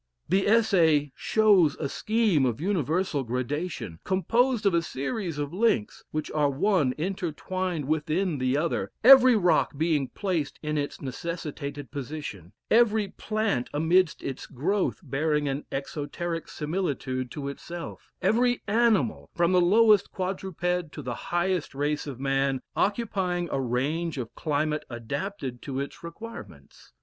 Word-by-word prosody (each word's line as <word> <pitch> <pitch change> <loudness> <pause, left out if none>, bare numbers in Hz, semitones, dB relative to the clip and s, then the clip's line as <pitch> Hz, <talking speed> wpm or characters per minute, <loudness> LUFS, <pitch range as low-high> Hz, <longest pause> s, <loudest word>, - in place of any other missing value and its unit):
The 190 +4 +2
Essay 170 -10 +4
shows 200 -9 +4
a 145 - -3
scheme 215 -3 +1
of 125 -1 0
universal 165 -3 0
gradation, 125 - -3
composed 230 +5 +1
of 200 - +4
a 170 - +3
series 165 - -3
of 145 +1 -3
links, 195 - +1
which 155 0 -4
are 150 -2 +2
one 145 -2 +2
entwined 180 -1 -3
within 155 +2 0
the 130 +2 +1
other 165 +2 -1
every 255 0 +9
rock 180 -7 +2
being 155 -3 +1
placed 170 0 -2
in 150 0 -1
its 145 -1 -3
necessitated 145 -1 -5
position 140 - -6 0.2
every 220 -3 +4
plant 215 - -1
amidst 165 +3 +2
its 135 -1 -5
growth 180 +9 -1
bearing 150 +1 0
an 140 +1 -3
exoteric 160 +4 -4
similitude 145 -6 -3
to 140 +2 -5
itself 170 +4 -7
every 245 +2 +2
animal, 225 0 +2
from 170 +1 +3
the 180 -1 +5
lowest 210 +2 +5
quadruped 180 -3 -2
to 150 - -7
the 125 -1 -3 0.2
highest 175 -4 0
race 145 +2 -1
of 135 -3 -6
man, 135 0 +1 0.2
occupying 190 -5 0
a 135 - 0
range 145 +7 -1
of 120 -3 -5
climate 150 0 -1
adapted 130 - -5
to 135 -1 -4
its 140 +4 -6
requirements. 225 +8 -10
160 Hz, 135 wpm, -27 LUFS, 140-190 Hz, 0.2 s, every